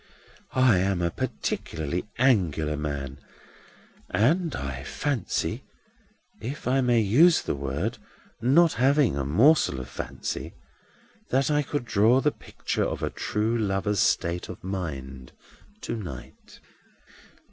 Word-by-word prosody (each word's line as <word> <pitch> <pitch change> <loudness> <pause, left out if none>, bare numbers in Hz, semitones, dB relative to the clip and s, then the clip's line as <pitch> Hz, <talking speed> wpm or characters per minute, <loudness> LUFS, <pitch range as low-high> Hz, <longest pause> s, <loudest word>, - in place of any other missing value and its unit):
"I 130 -7 +5
am 95 0 +1
a 85 - +1
particularly 80 +3 -3
Angular 85 - +2
man, 70 -2 -4 0.9
and 155 - +2
yet - - -4
I 65 -1 -5
fancy 135 - -2 0.8
(if 125 +6 -5
I 135 +1 +3
may 120 -2 +3
use 145 - +5
the - - -1
word, 70 - -3 0.4
not 155 +8 +5
having 135 - +3
a 70 - -1
morsel 90 - +4
of 65 - -7
fancy), - - -5 0.7
that 135 +3 +2
I 150 0 +3
could 145 -2 -3
draw 110 +3 +4
a 150 +3 +2
picture - - -4
of - - -3
a - - -1
true 110 +2 -1
lover's 105 -2 0
state 85 -1 +1
of - - -9
mind, 70 -9 -5 0.5
to - - -3
night." 90 - -9
105 Hz, 125 wpm, -26 LUFS, -, 0.9 s, I